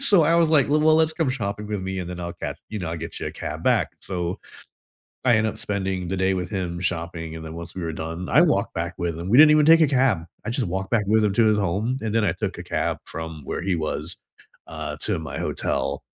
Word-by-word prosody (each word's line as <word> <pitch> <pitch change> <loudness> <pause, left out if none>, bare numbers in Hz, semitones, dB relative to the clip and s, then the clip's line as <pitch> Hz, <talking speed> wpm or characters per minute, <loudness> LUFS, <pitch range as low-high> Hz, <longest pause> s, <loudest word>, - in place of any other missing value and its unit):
So 205 -10 +5
I 165 - +3
was, 170 -2 +4
like, 145 -5 +4
l 150 +1 +4
well, 155 0 +5
let's 160 0 +3
come 160 -4 0
shopping 105 -4 -3
with 105 -3 -3
me 95 0 -3
and 90 - -5
then 90 - -6
I'll 85 0 -4
catch, - - -5
you 105 - -3
know, 85 -3 -4
I'll 85 - -3
get 80 - -6
you - - -3
a - - -9
cab - - -6
back. - - +3
So, 90 0 -3 0.9
I 120 -3 +6
end 110 0 +2
up 110 - -4
spending 95 -3 -2
the 95 - -2
day 95 +1 +2
with 90 0 -3
him 90 -4 -3
shopping, 85 -2 -3
and 80 - -7
then 80 - -7
once 85 +1 -8
we 90 - -4
were 80 - -2
done, 80 +3 -5
I 150 - +6
walked 150 - +1
back 85 +2 -2
with 85 -2 -2
him. 85 - -5
We 120 - +5
didn't 150 0 +9
even 150 -1 +5
take 165 0 +8
a 155 - +6
cab, 125 - +2 0.2
I - - -2
just 120 -5 -1
walked 95 +3 -3
back 110 -3 +2
with 110 +1 +4
him 100 - +1
to 115 +2 +4
his 105 -1 +3
home, 105 +7 0
and 110 -1 -2
then 115 - +3
I 85 - +1
took - - -4
a - - -6
cab - - -1
from 80 -1 -6
where - - -3
he 95 -2 +1
was, 80 +1 -3 0.5
uh, - - -5
to - - 0
my 80 - -6
hotel, - - -2
95 Hz, 270 wpm, -24 LUFS, 85-120 Hz, 0.9 s, didn't